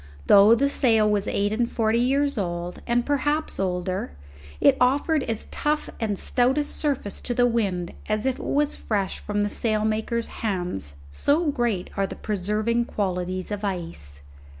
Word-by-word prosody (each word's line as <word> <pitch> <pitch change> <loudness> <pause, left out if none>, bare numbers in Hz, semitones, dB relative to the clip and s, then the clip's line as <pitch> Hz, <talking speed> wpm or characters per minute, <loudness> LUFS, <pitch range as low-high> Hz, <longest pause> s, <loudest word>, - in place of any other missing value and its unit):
Though 205 +3 +7
the 280 +4 +2
sail 225 -6 +3
was 205 -1 +1
eight 205 +1 0
and 235 +2 0
forty 225 0 +1
years 280 +3 +2
old 175 -3 -3
and 240 0 +1
perhaps 290 +2 0
older, 185 - -2 0.5
it - - +5
offered 285 +5 +3
as 225 -4 -3
tough 300 +1 -1
and 210 -3 -1
stout 250 +7 +2
a 295 - +2
surface 280 -8 -3
to 240 - -2
the 245 - +4
wind 195 -7 -1 0.2
as 215 +2 0
if 265 -1 0
it - - -7
was 290 +1 +1
fresh 200 -3 -2
from 205 0 -1
the - - +1
sailmaker's 220 +2 0 0.2
hands, 175 - -3 0.2
so 295 - +1
great 235 -8 -1
are 195 0 +1
the - - -7
preserving 215 +4 -1
qualities 185 -3 -3
of 205 0 -4
ice. 165 - -5
215 Hz, 165 wpm, -24 LUFS, 195-250 Hz, 0.5 s, Though